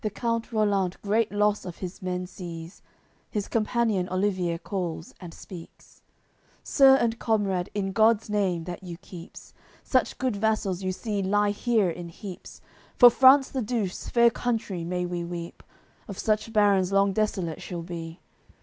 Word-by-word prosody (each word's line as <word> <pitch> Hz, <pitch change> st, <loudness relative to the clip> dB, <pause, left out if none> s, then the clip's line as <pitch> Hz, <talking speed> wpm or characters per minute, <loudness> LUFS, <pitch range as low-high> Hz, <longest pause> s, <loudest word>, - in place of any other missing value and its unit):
AOI. -, -, -11 dB
CXXVIII 210 Hz, -, -1 dB
The -, -, -12 dB
count 230 Hz, -1 st, -1 dB
Rollant 200 Hz, -4 st, 0 dB
great 215 Hz, +2 st, +1 dB
loss 210 Hz, 0 st, +1 dB
of 180 Hz, -2 st, -8 dB
his 185 Hz, +2 st, -7 dB
men 180 Hz, 0 st, -3 dB
sees, 170 Hz, -1 st, -9 dB, 0.5 s
His 205 Hz, -3 st, -3 dB
companion 220 Hz, -4 st, 0 dB
Olivier 185 Hz, -3 st, 0 dB
calls, 170 Hz, -2 st, -5 dB
and 175 Hz, -2 st, -8 dB
speaks: 170 Hz, 0 st, -13 dB, 0.6 s
"Sir 270 Hz, -2 st, +6 dB
and 230 Hz, -3 st, 0 dB
comrade, 200 Hz, -5 st, 0 dB
in 195 Hz, -2 st, -1 dB
God's 220 Hz, +2 st, +3 dB
Name, 195 Hz, -5 st, 0 dB
That 175 Hz, 0 st, -7 dB
you 175 Hz, -3 st, -8 dB
keeps, 175 Hz, -1 st, -12 dB, 0.3 s
Such 255 Hz, -2 st, +1 dB
good 255 Hz, -4 st, -1 dB
vassals 200 Hz, -3 st, 0 dB
you 185 Hz, -1 st, -1 dB
see 205 Hz, +1 st, -3 dB
lie 205 Hz, +2 st, +2 dB
here 210 Hz, -3 st, +1 dB
in 170 Hz, 0 st, -7 dB
heaps; 185 Hz, +2 st, -10 dB, 0.3 s
For 245 Hz, -1 st, +9 dB
France 265 Hz, +2 st, +6 dB
the 265 Hz, -, -2 dB
Douce, 215 Hz, -5 st, -3 dB
fair 235 Hz, -1 st, +5 dB
country, 220 Hz, -7 st, -2 dB
may 180 Hz, +1 st, -2 dB
we 175 Hz, -1 st, -3 dB
weep, 170 Hz, 0 st, -7 dB, 0.5 s
Of 200 Hz, -4 st, -7 dB
such 215 Hz, +1 st, 0 dB
barons 200 Hz, -4 st, +3 dB
long 195 Hz, 0 st, +3 dB
desolate 190 Hz, -6 st, -1 dB
she'll 175 Hz, -2 st, -6 dB
be. 165 Hz, -1 st, -7 dB
200 Hz, 165 wpm, -26 LUFS, 180-220 Hz, 0.6 s, For